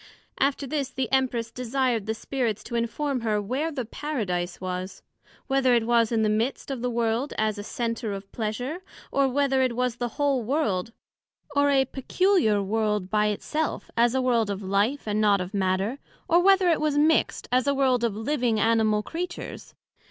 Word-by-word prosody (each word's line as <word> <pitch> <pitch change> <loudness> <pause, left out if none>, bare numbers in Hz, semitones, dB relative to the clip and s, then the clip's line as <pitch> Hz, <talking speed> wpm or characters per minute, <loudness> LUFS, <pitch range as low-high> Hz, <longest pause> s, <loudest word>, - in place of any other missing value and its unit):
After 275 +1 +1
this, 275 -1 -2
the 260 -2 -3
Empress 245 -4 +1
desired 250 -3 -1
the 220 - -1
Spirits 230 -3 -2
to - - -9
inform 255 +4 -1
her 215 -2 0
where 260 +10 -2
the 260 -5 -4
Paradise 200 - -3
was, 185 +1 -5 0.4
Whether 265 -2 +3
it 230 -1 +2
was 235 -1 +3
in 225 -1 +2
the - - +3
midst 225 +6 -1
of 260 -3 -4
the 250 - 0
World 235 +3 -1
as 215 -1 0
a - - -5
Centre 230 0 -3
of 195 0 -7
pleasure? 245 - -3 0.3
or, 275 -1 +3
Whether 270 0 +2
it 255 -2 +1
was 250 -1 -1
the 245 - -1
whole 285 -3 +2
World; 230 -6 -1 0.6
or 285 0 +4
a 270 -1 +4
peculiar 265 - +1
World 210 -2 -1
by 210 0 +3
it 210 -1 -2
self, 315 +1 -2
as 235 +2 +3
a 265 - +2
World 235 -4 +2
of 200 0 -3
Life, 205 +8 0
and 210 0 0
not 205 -2 +4
of 180 +2 -5
Matter; 195 +6 0 0.3
or 340 0 +5
whether 385 0 +5
it 330 - +2
was 300 -2 +1
mixt, 310 +2 +2
as 255 +1 +2
a 280 - +2
world 260 -3 +2
of 230 -4 0
living 235 -1 0
animal 220 -1 +2
Creatures? 345 +5 -6
240 Hz, 190 wpm, -26 LUFS, 215-275 Hz, 0.6 s, or